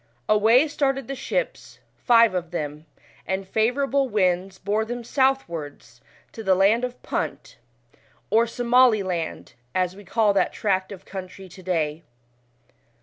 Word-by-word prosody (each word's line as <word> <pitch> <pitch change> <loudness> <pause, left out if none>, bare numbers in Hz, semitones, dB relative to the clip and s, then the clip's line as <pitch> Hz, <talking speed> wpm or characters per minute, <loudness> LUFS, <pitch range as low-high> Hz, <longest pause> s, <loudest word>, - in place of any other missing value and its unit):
Away 225 +7 +5
started 270 -4 -1
the 275 - -4
ships, 275 - -4 0.2
five 230 -4 +4
of 175 -2 -3
them, 150 -2 -5 0.4
and 190 0 -2
fav 220 +5 +1
ourable 275 -1 +1
winds 190 -2 0
bore 205 +3 -1
them 240 +2 -5
southwards 170 - -2 0.3
to 225 - -8
the 190 -2 +3
land 205 +6 +3
of 250 0 -4
Punt, - - -4 0.7
or 230 +2 +4
Somaliland, 230 -8 +1 0.2
as 185 0 0
we 205 - -12
call 210 +2 +2
that 195 - +1
tract 190 -2 -1
of 195 -2 -10
country 190 0 -8
to 185 +2 -13
day. 165 -3 -2
205 Hz, 140 wpm, -24 LUFS, 185-240 Hz, 0.7 s, Away